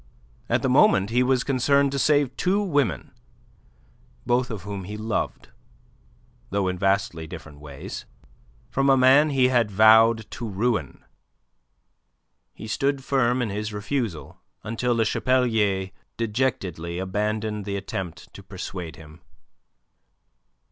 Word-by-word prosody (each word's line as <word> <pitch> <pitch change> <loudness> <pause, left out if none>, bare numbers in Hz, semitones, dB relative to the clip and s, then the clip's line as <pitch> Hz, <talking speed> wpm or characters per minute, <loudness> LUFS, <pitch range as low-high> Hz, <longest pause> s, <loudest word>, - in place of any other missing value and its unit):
At - - +1
the - - +2
moment 100 +2 +4
he 125 +2 +3
was 125 0 +2
concerned 140 +1 +2
to 140 - -2
save 145 -2 +2
two 185 +3 +1
women, 145 - 0 1.1
both 125 +1 +1
of 110 -4 -6
whom 100 -2 -6
he 105 +3 -6
loved, 110 0 -3 1.0
though 100 -1 0
in 90 -1 -3
vastly 95 -4 0
different 80 -4 -10
ways, 75 -2 -8 0.6
from 135 +1 +1
a 135 - +5
man 135 +4 +5
he 130 -3 +3
had 120 -4 +2
vowed 110 +2 +5
to 115 -3 -5
ruin. 110 +3 -2 1.5
He 110 - -9
stood 135 +5 -1
firm 125 -2 +1
in 110 - -3
his 105 +1 -4
refusal 105 - -4 0.2
until 115 +2 -1
Le 115 -1 +2
Chapelier 110 -6 +1 0.3
dejectedly 105 -8 -2
abandoned 105 +2 -2
the 100 -1 -3
attempt 95 -4 -6
to - - -11
persuade 90 -3 -7
him. 80 0 -14
110 Hz, 125 wpm, -24 LUFS, 95-125 Hz, 1.5 s, a